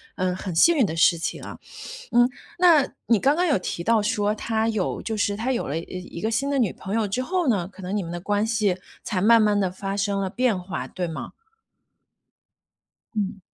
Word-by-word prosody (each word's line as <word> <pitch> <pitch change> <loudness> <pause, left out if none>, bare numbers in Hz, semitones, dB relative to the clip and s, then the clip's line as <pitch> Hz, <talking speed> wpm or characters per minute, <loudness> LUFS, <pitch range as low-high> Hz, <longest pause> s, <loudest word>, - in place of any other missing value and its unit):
嗯， 185 -1 -1
很 185 -1 -5
幸 335 - +6
运 255 - +4
的 165 - -3
事 170 0 +4
情 165 - -4
啊。 - - -8 0.6
嗯， 240 +1 +5 0.3
那 335 -6 +5 0.2
你 230 -2 +4
刚 275 +8 +3
刚 360 +1 +2
有 285 - +3
提 175 - -4
到 230 -1 +3
说 210 -1 0
他 220 0 -1
有 215 -5 -2
就 220 - -3
是 205 -1 0
他 245 +5 -1
有 240 - -2
了 145 - -2
一 - - -5 0.4
一 - - -5
个 220 +3 -1
新 250 +5 0
的 280 - +1
女 225 -7 +2
朋 190 +2 -6
友 220 -2 +1
之 250 +6 -1
后 350 +2 0
呢， 190 -7 +1
可 195 -1 -14
能 185 +3 -3
你 200 - 0
们 170 0 -6
的 175 - -4
关 205 +3 0
系 210 -5 +1 0.3
才 195 -4 -2
慢 230 +3 +6
慢 210 -1 +3
地 190 -2 +1
发 195 +2 -4
生 200 0 0
了 190 -1 -2
变 240 -5 +1
化， 180 +1 -5
对 180 -1 -4
吗？ 160 - -6 1.8
嗯。 200 -1 -2
210 Hz, 240 characters per minute, -24 LUFS, 190-230 Hz, 1.8 s, 幸